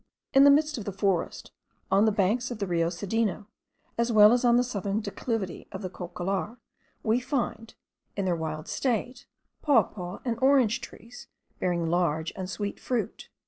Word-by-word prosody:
In 270 +1 +7
the - - +9
midst 295 -1 +3
of 205 - -7
the 200 - -3
forest, 195 -2 -1 0.4
on 200 +2 +5
the 220 - +4
banks 215 +5 +1
of 240 - -5
the 205 - -2
Rio 170 -2 +1
Cedeno, 205 +4 -2 0.5
as 235 +1 +2
well 210 0 +7
as 245 - +1
on 240 -1 +5
the 245 - +4
southern 205 -4 -2
declivity 205 -2 -4
of - - -7
the 185 - -4
Cocollar, 185 +5 -4 0.5
we 225 +2 +2
find, 240 -3 -3 0.4
in 200 - -1
their 180 -2 +1
wild 155 -1 -5
state, 245 0 -2 0.3
papaw 215 - +1
and 230 -2 -1
orange 260 -5 +4
trees, 235 +3 -11 0.3
bearing 175 -2 0
large 165 -2 0
and 185 -1 -5
sweet 205 +1 -4
fruit. 245 -3 -3
210 Hz, 170 wpm, -27 LUFS, 185-240 Hz, 0.5 s, the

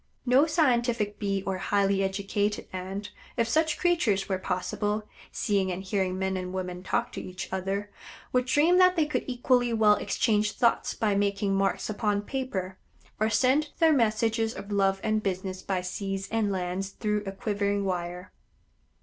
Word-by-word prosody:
No 265 +5 +5
scientific 240 -9 +1
Bee 195 -2 -1
or 190 -1 -2
highly 200 0 +1
educated 200 +2 -1
Ant, 190 +3 -5 0.3
if 230 -1 +2
such 315 +4 +1
creatures 330 - +1
were 190 -2 -1
possible, 205 +4 -2 0.2
seeing 195 -4 0
and 180 +1 -4
hearing 190 -1 -1
men 190 0 -1
and 180 -1 -4
women 180 -1 -4
talk 235 +5 -1
to - - -5
each 185 +1 -6
other, 195 +2 -2 0.4
would 250 0 +2
dream 305 +7 +4
that 365 0 +6
they 320 -3 +3
could 300 - -1
equally 245 -1 +2
well 215 -2 +5
exchange 210 -2 +1
thoughts 235 -2 +1
by 215 -3 +1
making 200 0 +1
marks 195 0 0
upon 210 -1 0
paper, 195 -7 -4 0.4
or 215 +1 +2
send 270 +6 +2
their 325 -2 +5
messages 225 -2 +1
of 200 - -8
love 195 -1 +2
and 215 -1 +1
business 185 -1 -3
by 185 -1 -1
seas 195 +1 -4
and 220 -2 +1
lands 185 +1 -2
through 210 +1 -1
a - - -2
quivering 200 0 -1
wire. 180 0 -3
205 Hz, 165 wpm, -27 LUFS, 190-230 Hz, 0.4 s, that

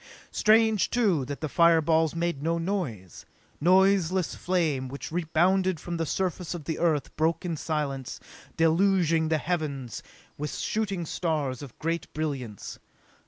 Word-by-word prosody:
Strange, 220 -1 +3
too, 200 - +2
that 140 +2 -6
the 155 - -1
fireballs 165 0 +3
made 170 -4 -1
no 165 +2 0
noise. 165 - -4 0.4
Noiseless 185 0 +3
flame 160 -8 0
which 140 +3 -7
rebounded 180 +2 +1
from 170 +2 -5
the 165 -1 -2
surface 180 -1 -2
of 165 - -7
the 160 +2 -3
Earth 155 -5 0
broke 160 +3 0
in 170 -2 -1
silence, 145 -4 -3 0.4
deluging 165 -1 +3
the 160 - +2
heavens 145 - -3 0.4
with 150 +1 -3
shooting 200 -5 -2
stars 150 -7 -2
of 135 -4 -10
great 165 +1 -3
brilliance. 135 -9 -4
165 Hz, 135 wpm, -27 LUFS, 150-180 Hz, 0.4 s, Strange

